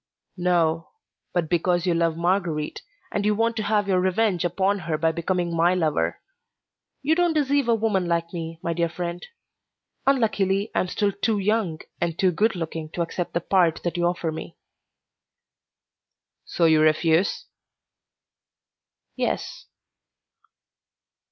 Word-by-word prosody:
"No, 170 -2 +1 0.4
but 175 -3 0
because 175 +1 +1
you 180 - +2
love 165 -1 +1
Marguerite, 170 -3 -1 0.3
and 205 - -1
you 210 0 +2
want 230 +1 +1
to - - 0
have 205 -1 +1
your 185 -2 +2
revenge 185 0 +1
upon 195 +3 +1
her 165 -3 -2
by 160 +1 +2
becoming 170 +1 -1
my 170 +2 +3
lover. 160 -4 0 0.8
You 300 +3 +3
don't 345 0 +2
deceive 285 -3 +2
a 230 - +5
woman 210 -5 0
like 170 0 -1
me, 165 -1 -5
my 170 - -1
dear 170 0 0
friend; 175 +1 -5 0.8
unluckily, 210 -6 +2
I - - +1
am 185 - 0
still 205 +2 0
too 210 +2 0
young 200 -5 0 0.2
and 170 -1 -1
too 185 -2 +3
good 210 +5 +1
looking 160 -2 -5
to 175 - 0
accept 170 +1 -4
the 170 - +1
part 175 -2 +2
that 175 0 -2
you 175 0 +2
offer 175 -2 -1
me." 160 +1 -8 1.9
"So 170 - +1
you 160 -1 +5
refuse?" 160 +4 +2 1.7
"Yes. - - -3
175 Hz, 145 wpm, -24 LUFS, 165-200 Hz, 1.9 s, a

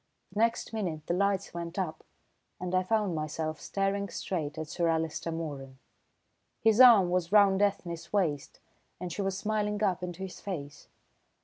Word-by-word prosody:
The 210 - -3
next 230 0 +1
minute 170 -8 -3
the - - -1
lights 200 +1 0
went 170 +1 -6
up, 180 -5 -3 0.6
and 180 0 -4
I 185 - +4
found 210 -1 0
myself 155 0 -3
staring 200 0 -1
straight 160 -4 -3
at 160 -1 -4
Sir 170 +3 -1
Alister 160 0 -1
Moeran. 145 -5 -5 0.8
His 225 +2 +5
arm 215 -8 +8
was 180 -1 0
round 200 -2 +5
Ethne's 180 -5 -1
waist 160 -9 -1 0.4
and 180 -1 -5
she 205 - -3
was 195 -1 -1
smiling 210 0 -1
up 185 -3 +1
into 180 +1 -5
his 190 - -8
face. 145 -8 -6
180 Hz, 165 wpm, -30 LUFS, 165-200 Hz, 0.8 s, arm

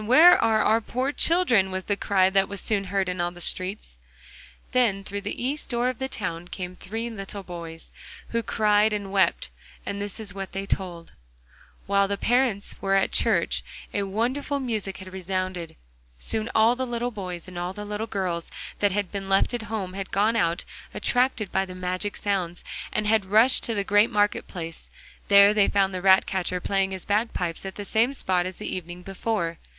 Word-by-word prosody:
where 315 +9 +8
are 220 -1 +3
our 225 +1 +3
poor 255 +5 -2
children?' 290 - +3
was 190 0 -3
the 205 - 0
cry 195 -2 +3
that 195 0 +2
was 200 -1 -4
soon 200 -1 -1
heard 195 0 0
in 180 -1 -2
all 175 - 0
the 175 0 -13
streets. 185 - -1 0.7
Then 230 -6 +2
through 200 +1 -4
the 205 - -5
east 280 +4 -2
door 240 0 +1
of 255 - -5
the 265 - -1
town 175 -7 -4
came 180 0 -6
three 225 +6 -5
little 195 -2 -7
boys, 170 -2 -8 0.4
who 230 - 0
cried 215 -1 +2
and 200 -2 -3
wept, 190 - +2 0.4
and 200 0 -4
this 205 +2 -4
is 205 -4 -5
what 195 -1 -6
they 195 +1 -3
told: 175 -4 -3 0.7
While 200 0 +3
the 200 0 -2
parents 240 -3 +1
were 195 0 +2
at 195 - +2
church - - +2 0.3
a 205 - 0
wonderful 245 +9 -1
music 220 -7 -3
had 185 -1 -10
resounded. 185 -2 -3 0.4
Soon 220 - -2
all 225 +2 +5
the 260 0 -3
little 240 0 -2
boys 180 -5 -6
and 185 - -11
all 175 +1 -2
the 210 +2 -7
little 210 +2 -4
girls 180 -5 -2 0.3
that 205 -1 +3
had 200 -1 -2
been 195 -1 -5
left 195 +5 +3
at 240 - -2
home 200 -5 -3
had 195 0 -5
gone 215 +3 +2
out, 175 -5 +1 0.3
attracted 245 -6 +1
by 190 - +2
the 185 -1 -8
magic 185 +3 -2
sounds, 185 -4 -2 0.3
and 215 - -1
had 215 -1 +3
rushed 220 +7 +5
to 230 - -1
the 200 - 0
great 205 +3 +4
market 205 -1 +1
place. 165 -3 -7 0.4
There 200 0 +7
they 210 -2 +4
found 195 -1 +2
the 185 - -3
ratcatcher 190 -1 +3
playing 195 +1 0
his 190 -1 -5
bagpipes 200 -5 -1
at 190 - -7
the 205 - -6
same 230 +6 +2
spot 185 -6 +2
as 185 - -7
the 210 - -4
evening 175 0 -7
before. 195 -3 -2
200 Hz, 195 wpm, -25 LUFS, 185-220 Hz, 0.7 s, where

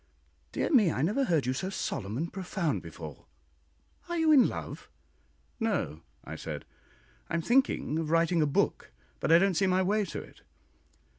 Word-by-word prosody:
"Dear - - -1
me, 215 - +5
I 130 - -1
never 230 - +1
heard 160 - +1
you 130 - 0
so 185 +9 -3
solemn 105 - -3
and 165 +4 -3
profound 180 -5 -2
before. 80 -3 -10 0.8
Are 345 - -1
you 320 -1 +4
in 275 -5 +7
love?" - - -7 0.7
"No," 180 - -1 0.2
I - - -7
said; - - -6 0.6
"I - - -1
am 165 - -1
thinking 240 - +2
of 160 -2 -3
writing 165 +1 +3
a 150 - +3
book, 140 - 0 0.3
but - - 0
I 165 - +9
don't 195 +2 +3
see 195 +3 +2
my 185 0 +3
way 210 +3 +2
to 170 - -5
it." - - -13
170 Hz, 175 wpm, -29 LUFS, 150-205 Hz, 0.8 s, I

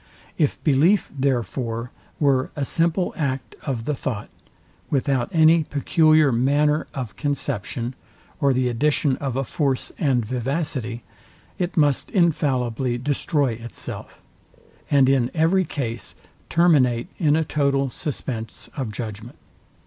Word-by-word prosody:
If 150 -4 +1
belief, 160 +7 +3
therefore, 120 -3 -1 0.3
were 135 -3 +2
a 145 - -1
simple 170 +5 +1
act 135 -4 -2
of 125 -6 -3
the 150 - 0
thought, 125 -6 -4 0.6
without 135 -3 +1
any 160 0 +5
peculiar 155 0 +3
manner 145 +5 +2
of 125 -7 -5
conception, 130 -4 -2 0.5
or 140 -3 +3
the 130 -1 +1
addition 140 +3 +1
of 135 -3 -3
a 135 - 0
force 135 +1 -1
and 130 -8 +2
vivacity, 125 -1 -2 0.6
it 175 -1 -2
must 145 -3 +2
infallibly 130 - +1
destroy 140 +1 0
itself, 115 +1 -8 0.7
and 140 -2 +5
in 130 -3 +3
every 175 +4 +3
case 120 -7 -4 0.3
terminate 145 -7 +3
in 150 -4 +3
a 160 - +2
total 140 -3 +1
suspense 120 -6 -5
of 130 -6 -3
judgment. 110 +1 -7
135 Hz, 120 wpm, -23 LUFS, 125-150 Hz, 0.7 s, any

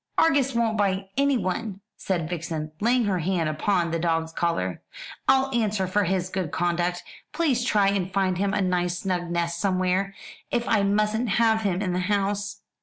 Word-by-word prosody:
"Argus 275 -5 +3
won't 225 -2 +1
bite 195 -1 0
anyone," 225 -7 0 0.2
said 175 -5 -2
Vixen, 160 -2 -4
laying 240 +3 +3
her 190 -3 0
hand 170 -1 0
upon 170 +2 0
the 165 - -1
dog's 165 -1 0
collar, 165 - -1 0.5
"I'll 265 0 +3
answer 215 -5 +1
for 200 +2 +1
his 185 0 -1
good 185 -4 -2
conduct. 175 +1 -1 0.3
Please 280 -8 +1
try 205 -5 +3
and 195 -2 -1
find 185 -2 0
him 200 0 +1
a 205 0 0
nice 180 -1 0
snug 180 -2 -2
nest 170 0 -1
somewhere 190 0 0 0.3
if 240 -1 -1
I 215 -2 +3
mustn't 210 +3 +1
have 220 +1 +3
him 195 -2 0
in 185 -3 -1
the 180 - 0
house." 205 +1 -1
195 Hz, 175 wpm, -25 LUFS, 175-210 Hz, 0.5 s, Argus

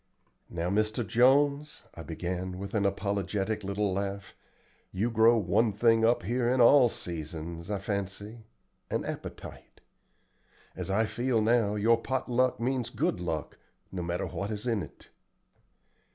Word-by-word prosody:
"Now, 85 +1 -2
Mr. 110 +3 0
Jones," 140 +6 +2
I - - -9
began 90 +3 -4
with 100 +1 -7
an 100 -3 +2
apologetic 100 +1 -2
little 100 0 -1
laugh, 100 +1 -4 0.6
"you 110 +6 -1
grow 115 +1 +5
one 110 +3 +2
thing 115 +2 +3
up 115 -3 +3
here 120 +5 0
in 130 +1 +1
all 125 +1 +7
seasons, 85 -1 -6
I 105 - -1
fancy 100 +2 -4 0.5
an - - -2
appetite. - - -8 1.0
As - - -5
I 105 +4 +2
feel 120 +2 0
now, 110 -1 +2
your 115 +2 +3
pot 130 +1 -2
luck 125 +1 +2
means 125 -1 -1
good 110 -6 -1
luck, 80 -4 -4 0.3
no 95 - -4
matter 85 0 -2
what 100 - -4
is 105 +1 -4
in 115 -4 0
it." - - -11
105 Hz, 145 wpm, -29 LUFS, 95-120 Hz, 1.0 s, all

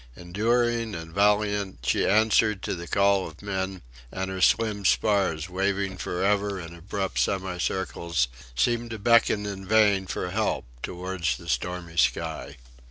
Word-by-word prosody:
Enduring 115 +4 0
and 80 -1 -8
valiant, 105 -2 +1
she - - +2
answered 105 -1 +3
to - - -2
the 85 -1 -6
call 100 0 +2
of 80 +4 -13
men; 95 -3 -3 0.3
and 95 0 -3
her 95 0 -4
slim 105 0 +2
spars 95 -5 +2
waving 95 +1 -1
for 90 0 -3
ever 100 0 +1
in 85 -1 -8
abrupt 95 +3 -3
semicircles, 90 -5 -1 0.3
seemed 120 - +1
to 110 - -5
beckon 110 -1 +3
in 100 -1 -5
vain 100 -2 +3
for 90 - -3
help 110 +3 -1 0.2
towards 90 0 -2
the 85 - -13
stormy 85 -1 -3
sky. - - 0
95 Hz, 145 wpm, -26 LUFS, 90-105 Hz, 0.3 s, answered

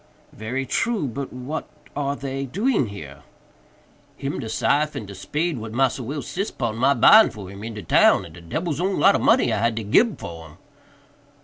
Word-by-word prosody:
"Very 125 +5 -4
true; 225 - 0
but 130 +3 -5
what 130 +5 -6 0.3
are 140 -1 -1
they 135 0 -4
doing 200 - 0
here?" 75 -9 -10 1.0
"Him 140 -1 -4
de 115 -4 -5
syfe 150 +6 +1
and 105 - -5
de 100 - -9
spade 150 - -2
what 110 0 -7
Massa 135 0 +1
Will 140 +4 -5
sis 195 - -3
pon 115 -4 -3
my 130 +4 +3
buying 220 +1 +7
for 100 -3 -10
him 100 +1 -10
in 115 0 -6
de 105 - -7
town, - - +4
and 80 - -13
de 85 - -12
debbil's 155 - -3
own 190 +1 0
lot 195 - +6
of - - 0
money 240 +3 +3
I - - 0
had 115 -1 +1
to 115 - -3
gib 210 - +3
for 80 -1 -8
'em." 75 +2 -17
130 Hz, 205 wpm, -23 LUFS, 110-155 Hz, 1.0 s, buying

